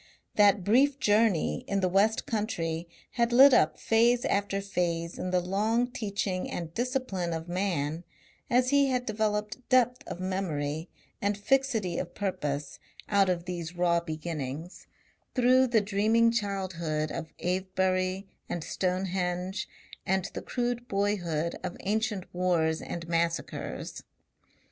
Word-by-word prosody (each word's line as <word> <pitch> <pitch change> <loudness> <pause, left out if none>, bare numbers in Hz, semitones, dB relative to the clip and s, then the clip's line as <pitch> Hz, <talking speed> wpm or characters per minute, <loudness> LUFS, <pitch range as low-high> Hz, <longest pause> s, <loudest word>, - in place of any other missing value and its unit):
That 205 -2 +5
brief 265 +8 +4
journey 210 0 +2
in 200 - 0
the 185 - +2
west 200 +4 +2
country 170 -7 -2 0.2
had 235 -1 +1
lit 265 +3 +8
up - - +4
phase 235 +2 +3
after 200 0 0
phase 175 -4 -2
in 185 - -2
the 180 0 +2
long 220 +7 0
teaching 200 -5 -2
and 165 -2 -5
discipline 240 -8 -1
of 160 +1 -5
man 175 -4 -1 0.5
as 255 +1 +3
he 280 -1 +5
had 250 -2 0
developed 215 0 -1
depth 250 -1 +3
of - - -6
memory 165 -4 -2 0.3
and 200 0 0
fixity 225 -5 +1
of 175 - -6
purpose 145 -8 -3 0.3
out 200 -2 +4
of 175 -1 -1
these 175 -1 -5
raw 175 -1 +3
beginnings, 160 -1 -6 0.5
through 255 +1 +5
the 230 -3 +3
dreaming 215 +3 +3
childhood 185 -8 -2
of 160 - -5
Avebury 185 +1 0 0.2
and 175 - -3
Stonehenge 185 +1 -2 0.3
and 190 0 0
the - - -4
crude 245 -1 -2
boyhood 175 -6 -1
of 180 -1 -4
ancient 210 -1 -1
wars 170 -3 +1
and 170 -1 -6
massacres. 170 0 -2
190 Hz, 130 wpm, -29 LUFS, 175-220 Hz, 0.5 s, lit